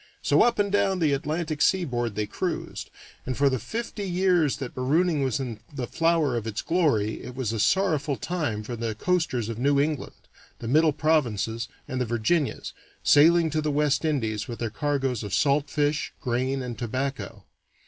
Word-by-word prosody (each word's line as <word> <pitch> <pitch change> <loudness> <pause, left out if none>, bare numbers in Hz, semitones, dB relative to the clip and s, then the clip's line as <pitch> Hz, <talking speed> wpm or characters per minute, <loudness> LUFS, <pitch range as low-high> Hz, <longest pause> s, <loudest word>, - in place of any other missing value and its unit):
So - - +4
up 240 -1 +3
and 200 -1 +1
down 200 -1 +2
the 155 -5 +2
Atlantic 155 +1 -2
seaboard 125 - +1
they 105 0 -1
cruised, - - -4 0.3
and 130 -1 -4
for 140 -1 +3
the 130 - 0
fifty 225 - -5
years 175 -5 +2
that 135 -3 -6
marooning 150 +5 +1
was 130 -2 0
in 120 -5 -5
the 135 -4 -4
flower 165 -2 +1
of 115 -1 -3
its 110 -1 -3
glory 140 - +1
it 125 - -8
was 125 -4 -2
a 110 - -2
sorrowful 155 - +2
time 145 -11 -3
for 120 +3 -5
the 115 -1 -3
coasters 145 -6 0
of 115 -1 -5
New 140 +2 +3
England, 150 0 -1 0.4
the 115 - -7
middle 155 +5 +4
provinces, 120 -7 0 0.2
and 130 0 -3
the - - +1
Virginias, 120 +7 -1 0.3
sailing 165 +2 +5
to 155 +1 0
the 155 - -1
West 145 0 +1
Indies 115 -9 -1
with 120 - -6
their 115 -2 -3
cargoes 135 -3 -1
of 105 -3 -2
salt 145 0 +2
fish, 150 +1 0
grain, 130 +2 -1
and 120 -4 -6
tobacco. 130 +3 -4
140 Hz, 180 wpm, -26 LUFS, 120-160 Hz, 0.4 s, sailing